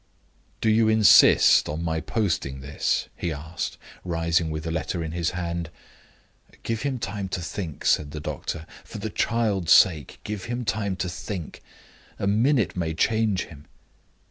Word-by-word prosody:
"Do 110 - +2
you 110 0 +4
insist 110 -3 +6
on 80 +3 -3
my 80 -1 -1
posting 80 -12 -2
this?" 70 +3 -1
he 85 - -3
asked, 80 +3 -5 0.3
rising 85 -1 0
with 80 0 -4
the 80 - -3
letter 85 +1 -2
in 80 - -5
his 85 0 -1
hand. 85 -2 -3 0.9
"Give 115 -1 -2
him 140 -2 -1
time 100 -4 -4
to 90 - -3
think," 85 -2 -6
said 75 - +2
the 75 - -6
doctor. 80 +2 -5 0.2
"For - - -9
the - - -4
child's 105 -7 +2
sake, 80 -7 +4
give 105 -3 -5
him 120 0 -4
time 100 -3 -1
to 90 0 -3
think! 85 -1 -6 0.6
A - - -3
minute 115 +4 +2
may 80 -3 -2
change 110 -1 +1
him." 75 -3 -14
90 Hz, 160 wpm, -25 LUFS, 80-105 Hz, 0.9 s, insist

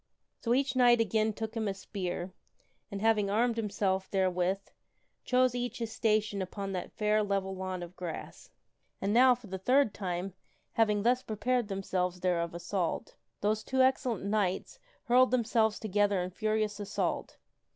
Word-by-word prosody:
So 235 +1 +1
each 270 0 0
knight 245 -2 +5
again 220 0 +2
took 220 +1 -5
him 225 -2 -2
a 195 - -2
spear, 185 -2 -5 0.6
and 200 +1 -5
having 215 -3 +3
armed 230 +3 +2
himself 195 -3 -1
therewith, 185 -1 +1 0.7
chose 255 -1 +3
each 245 0 -3
his 230 -2 -4
station 215 -2 +1
upon 195 +1 -4
that 185 -2 -4
fair, 215 0 +1
level 195 -2 -1
lawn 185 -1 -4
of 175 +1 -10
grass. 175 -3 -7 0.5
And 200 +1 0
now, 250 +1 +6
for 245 -1 -15
the 190 -1 -6
third 255 +2 +3
time, 185 -1 -3 0.4
having 210 -2 +2
thus 250 +2 +3
prepared 240 +1 -1
themselves 185 -2 -2
thereof 170 -2 0
assault, 175 0 -2 0.3
those 215 +1 +1
two 260 0 +2
excellent 260 -6 +1
knights 200 - -1 0.2
hurled 255 0 +5
themselves 225 -3 +2
together 205 -2 +1
in 180 - -5
furious 215 +1 -1
assault. 205 -1 -2
210 Hz, 155 wpm, -31 LUFS, 190-230 Hz, 0.7 s, now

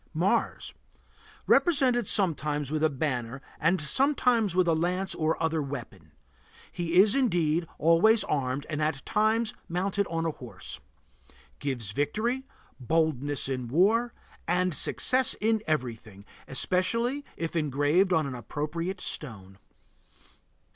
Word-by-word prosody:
MARS. 195 +8 0 0.7
Represented 260 - +3
sometimes 150 -6 +1
with 155 0 -1
a 155 - +4
banner 130 -3 -3 0.2
and 175 +4 +2
sometimes 240 - +2
with 185 -1 +3
a 165 - +3
lance 180 +4 -1
or 160 0 -1
other 160 -1 0
weapon. 95 - -8 0.6
He 170 -1 -3
is, 200 +3 +6
indeed, 175 - +1
always 180 +8 +4
armed 135 -1 -2
and 155 -1 -3
at 150 -3 -2
times 220 +1 +1 0.2
mounted 190 +3 -1
on 165 0 -2
a 165 - 0
horse. 125 -5 -9 0.8
Gives 125 -8 -3
victory, 220 - -2 0.3
boldness 145 0 0
in 130 -2 -3
war, 210 - +2 0.4
and 180 +1 +1
success 255 - +3
in 220 0 +1
everything, 115 -9 -4 0.2
especially 230 - 0
if 165 0 -4
engraved 150 +5 +2
on 160 -4 +2
an 135 - -5
appropriate 155 +9 -4
stone. 100 -8 -5
165 Hz, 120 wpm, -27 LUFS, 145-200 Hz, 0.8 s, is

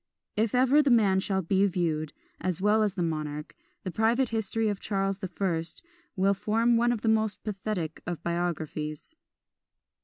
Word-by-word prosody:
If 220 +2 +1
ever 265 +4 +5
the 285 - +1
man 205 -6 +4
shall 190 0 0
be 190 +3 +2
viewed, 160 -5 -1 0.3
as 185 -3 -2
well 210 +3 +3
as 205 -3 +1
the 180 - 0
monarch, 150 -2 -4 0.3
the 185 - -4
private 230 +6 +2
history 225 0 0
of 205 -2 -1
Charles 195 -1 -1
the 190 - -4
First 175 - -3 0.3
will 195 +1 +3
form 225 +4 +2
one 240 +1 +3
of 235 -3 -2
the 225 - -2
most 220 -1 +1
pathetic 195 -6 -3
of 175 -2 -4
biographies. 165 - -3
195 Hz, 165 wpm, -28 LUFS, 170-220 Hz, 0.3 s, ever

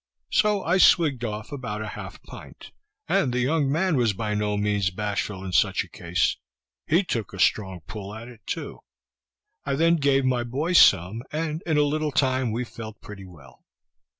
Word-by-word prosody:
So 210 -2 +2
I 175 +3 +2
swig'd 145 -10 +4
off 105 +1 -5
about 110 -7 -5
a 110 - -5
half - - -9
pint, - - -12 0.4
and 190 -10 +2
the 125 - -1
young 140 +2 +1
man 165 +3 +1
was 120 -5 +2
by 105 +1 -3
no 105 0 -1
means 105 -2 +1
bashful 100 0 -3
in 95 - -5
such - - +2
a - - -14
case; 85 +2 -1 0.5
he 170 +6 +3
took 115 - -3
a 95 - -8
strong 95 -2 +1
pull 105 -1 -7
at 115 +2 -9
it 120 -3 -14
too. - - -5 0.8
I 140 - -1
then 165 +3 +3
gave 140 -2 +2
my 125 -2 +1
boy 140 +9 -2
some, 100 - +5
and 155 +1 -3
in 160 -2 +2
a 150 - +5
little 150 +1 -1
time 130 -3 +1
we 120 +3 -2
felt 110 -2 -9
pretty 100 -2 -10
well. 80 -8 -16
120 Hz, 185 wpm, -25 LUFS, 105-150 Hz, 0.8 s, some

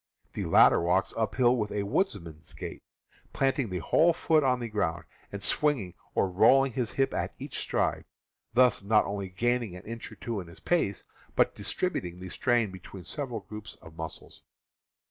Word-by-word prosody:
The - - -3
latter - - +6
walks 90 +3 +1
uphill 120 +2 +2
with 105 -4 -2
a 105 - -1
woodsman's 85 - -2
gait, - - -7 0.5
planting 135 -3 +1
the 90 - -3
whole 165 - +3
foot 160 -2 +2
on 125 -2 +2
the 120 - -3
ground, 100 -7 -1 0.3
and 100 -1 -6
swinging 130 - +2 0.2
or - - +3
rolling 130 +9 +5
the 125 0 -1
hip 135 +4 0
at - - -2
each - - -6
stride, - - -1 0.5
thus 125 -4 +5
not 105 +2 +3
only 100 -1 -4
gaining 120 +1 -1
an 90 - -10
inch 115 +1 -7
or - - -10
two 115 -3 -4
in 90 - -8
his 85 - -13
pace, 135 - 0 0.3
but - - +3
distribut 180 - -2
ing 90 0 -8
the 95 0 -7
strain 120 -1 +1
between 95 0 -10
several 125 - -4
groups 105 +2 -9
of 80 0 -15
muscles. 80 -1 -8
105 Hz, 180 wpm, -29 LUFS, 95-125 Hz, 0.5 s, latter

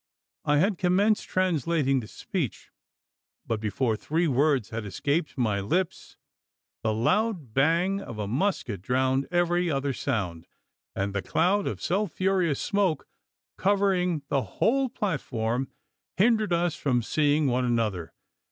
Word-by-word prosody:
I 145 0 +3
had 190 +4 +2
commenced 200 +4 +2
translating 165 -6 +1
the 110 - -7
speech; 170 - -4 0.7
but, 115 -2 -1
before 110 +2 0
three 160 +9 0
words 135 -4 +2
had 115 0 -4
escaped 145 - -2
my 110 -5 +1
lips, 165 - -2 0.6
the 110 - 0
loud 155 - 0
bang 170 - +2
of 115 - -8
a 105 -1 -3
musket 125 - -1
drowned 130 +4 +1
every 175 0 +1
other 140 -2 -1
sound; 95 - -3 0.5
and 100 0 -2
the 100 - -1
cloud 190 - +1
of - - -4
sulphureous 185 -4 0
smoke 200 -6 0 0.5
covering 185 -5 +2
the 135 - +2
whole 265 - +1
platform, 135 - -2 0.5
hindered 215 0 +3
us 170 -1 +1
from 125 -4 0
seeing 150 +3 +2
one 125 -1 +1
another! 110 -8 -1
150 Hz, 130 wpm, -27 LUFS, 120-185 Hz, 0.7 s, I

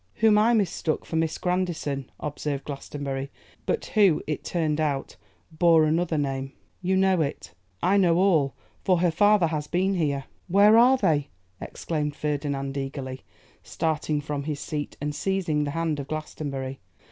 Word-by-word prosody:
'Whom 220 -1 +4
I 230 +3 +4
mistook 175 -6 -1
for - - -5
Miss 160 -1 0
Grandison,' 175 -7 -2
observed 145 -1 -3
Glastonbury, 140 -1 -5 0.4
'but - - 0
who, 200 -7 +4
it 150 - -3
turned 160 -3 -1
out, 140 -3 -2 0.4
bore 165 0 +4
another 160 +1 +1
name.' 135 -1 -2 0.3
'You 190 +1 +1
know 190 -2 +3
it?' 120 - -4 0.3
'I 195 +3 +4
know 175 -4 +4
all; 165 -8 +3 0.3
for 180 -3 +2
her 175 -2 +3
father 205 +2 +4
has 155 -2 -2
been 190 +4 +1
here.' 145 -6 0 0.2
'Where 200 +4 +6
are 250 +3 +6
they?' 155 - +1 0.3
exclaimed 150 -3 -3
Ferdinand 140 -2 -2
eagerly, 135 -1 -5 0.4
starting 155 -2 -1
from 145 -1 -3
his 150 -2 -3
seat 150 -1 -5
and 150 +1 -3
seizing 165 -4 0
the - - -2
hand 160 -3 0
of 140 - -5
Glastonbury. 140 -3 -5
155 Hz, 155 wpm, -26 LUFS, 145-180 Hz, 0.4 s, Where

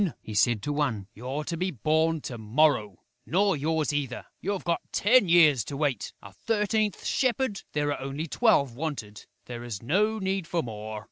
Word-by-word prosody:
he 110 - -7
said 105 0 +2
to 145 - -1
one. 130 -9 -1
"You're 130 +6 -4
to 170 - -3
be 180 +3 -1
born 160 - +1
to 120 -4 -6
morrow!... 110 - +1 0.2
Nor 195 +2 +2
yours 155 +1 0
either, 135 -4 -3 0.2
you've 200 0 -2
got 170 -1 0
ten 210 -2 +4
years 155 - +6
to 140 - -5
wait.... 140 -7 -1
A 100 - -12
thirteenth 215 - -1
shepherd?... 255 -5 0
There 145 -1 0
are 140 - -7
only 135 +4 -4
twelve 150 - +2
wanted; 130 -8 -5 0.2
there 120 -1 -7
is 115 -4 -6
no 210 - +2
need 190 -3 -2
for 170 -1 -1
more.... 110 -1 -6
150 Hz, 180 wpm, -27 LUFS, 120-185 Hz, 0.2 s, years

